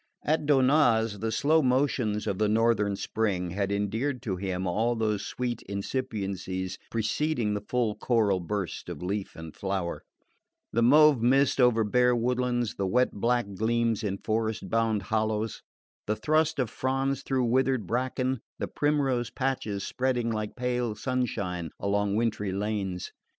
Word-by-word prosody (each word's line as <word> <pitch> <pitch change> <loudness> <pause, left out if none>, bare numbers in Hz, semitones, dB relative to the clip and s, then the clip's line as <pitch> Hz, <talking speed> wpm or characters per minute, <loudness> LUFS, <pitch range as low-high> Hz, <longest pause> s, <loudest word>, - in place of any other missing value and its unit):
At 155 -1 0
Donnaz 130 -6 +3
the 110 +2 -2
slow 150 +8 +3
motions 125 -5 +1
of 95 - -2
the 105 -1 +2
northern 110 -2 +2
spring 95 -4 -1
had 100 +2 -1
endeared 110 +7 -1
to 95 -4 -2
him 95 0 -3
all 110 +7 +1
those 110 -3 0
sweet 120 -2 -3
incipiencies 100 -4 -3
preceding 115 +1 0
the 105 - -2
full 115 0 0
choral 105 -5 +1
burst 95 0 -4
of - - -6
leaf 100 +2 -3
and 80 -1 -9
flower: 95 -3 -3 0.7
the 115 - +2
mauve 145 +1 +6
mist 135 +2 +3
over 120 -2 +4
bare 125 +3 +3
woodlands, 120 -1 0
the 100 - 0
wet 125 +6 +2
black 115 -1 0
gleams 115 +2 0
in 100 -2 -1
frost 110 0 -2
bound 110 -3 +1
hollows, 110 +1 -1 0.5
the 105 - +1
thrust 155 +4 +1
of 125 -5 -1
fronds 135 +1 -1
through 130 -2 0
withered 130 -1 +1
bracken, 130 +3 -1 0.2
the - - -3
primrose 135 -5 0
patches 125 -7 -2
spreading 125 -2 0
like 110 -1 -3
pale 125 -3 -1
sunshine 100 -10 -2
along 100 0 0
wintry 110 -3 0
lanes. 100 -2 -3
115 Hz, 145 wpm, -28 LUFS, 100-125 Hz, 0.7 s, mauve